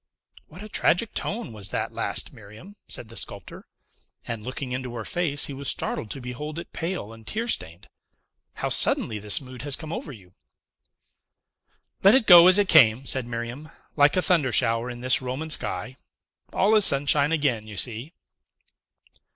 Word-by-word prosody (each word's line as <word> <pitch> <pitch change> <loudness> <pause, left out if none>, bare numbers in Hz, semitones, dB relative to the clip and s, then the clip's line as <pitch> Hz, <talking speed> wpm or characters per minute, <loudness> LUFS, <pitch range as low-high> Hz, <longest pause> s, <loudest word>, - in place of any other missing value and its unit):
"What 180 +6 -12
a - - -8
tragic 215 +1 0
tone 210 - -4
was 100 -2 -6
that - - -3
last, - - -3
Miriam!" 110 - -14
said 110 - -7
the 115 - -12
sculptor; - - -8 0.6
and, 115 -2 -4
looking 130 +2 -6
into 125 -1 -5
her 110 -2 -6
face, 155 -5 -1
he 140 - -6
was 140 0 -6
startled 110 - -2
to 135 - -6
behold 135 +5 -7
it 170 - -9
pale 165 - -4
and 110 -1 -16
tear 225 +2 -3
stained. 85 - -3 0.7
"How - - -3
suddenly 110 -2 +4
this 105 -2 +1
mood 130 -2 -11
has 145 -1 0
come 160 0 -8
over 150 - -6
you!" 95 -8 -15 1.7
"Let 195 +4 +6
it 265 -4 +3
go 175 -2 +9
as 185 +1 +6
it 205 -1 +2
came," 130 -7 +5
said 130 -2 -2
Miriam, 120 +6 -6 0.3
"like 145 +3 +3
a 185 - +2
thunder 165 -9 +2
shower 115 +1 0
in 120 -1 -8
this 130 +1 +2
Roman 130 +5 -5
sky. 130 -2 -1 0.5
All 205 +3 +2
is 215 -1 +5
sunshine 140 -1 +4
again, 130 -9 -1
you 105 -2 -10
see!" 120 - -2
135 Hz, 175 wpm, -24 LUFS, 115-165 Hz, 1.7 s, go